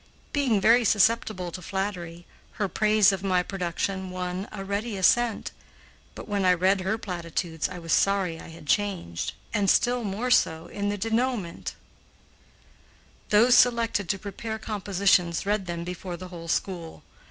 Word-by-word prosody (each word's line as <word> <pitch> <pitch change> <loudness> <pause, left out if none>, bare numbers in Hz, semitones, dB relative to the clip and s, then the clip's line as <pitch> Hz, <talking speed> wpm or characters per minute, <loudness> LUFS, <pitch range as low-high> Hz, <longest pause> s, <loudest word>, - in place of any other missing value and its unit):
Being 260 -8 +2
very 230 +5 +5
susceptible 210 -3 +2
to 185 - -7
flattery, 175 -3 -4 0.3
her 205 - -1
praise 215 +2 +4
of 195 -2 -3
my 185 -2 +2
production 190 +1 -3
won 180 +1 -4
a 195 -2 -6
ready 205 +2 -3
assent; 235 +4 +2 0.6
but - - -9
when 205 -2 -1
I 180 -1 +5
read 190 +2 +2
her 200 +4 -1
platitudes 170 -4 -3
I 185 - -7
was 165 -2 -2
sorry 190 -4 +2
I - - -10
had 165 -1 -12
changed, 180 - -1 0.2
and 205 -3 +2
still 245 +2 +3
more 215 +5 -2
so 160 -9 +3
in 200 +3 -3
the 205 - -2
denouement. 225 -3 -2 1.5
Those 230 +4 +5
selected 230 -6 +3
to 200 - +1
prepare 210 +3 -5
compositions 195 -5 +1
read 205 -2 0
them 170 -1 -4
before 180 0 -6
the 185 +1 -9
whole 170 -2 -9
school. 170 -1 -3
195 Hz, 155 wpm, -26 LUFS, 180-215 Hz, 1.5 s, very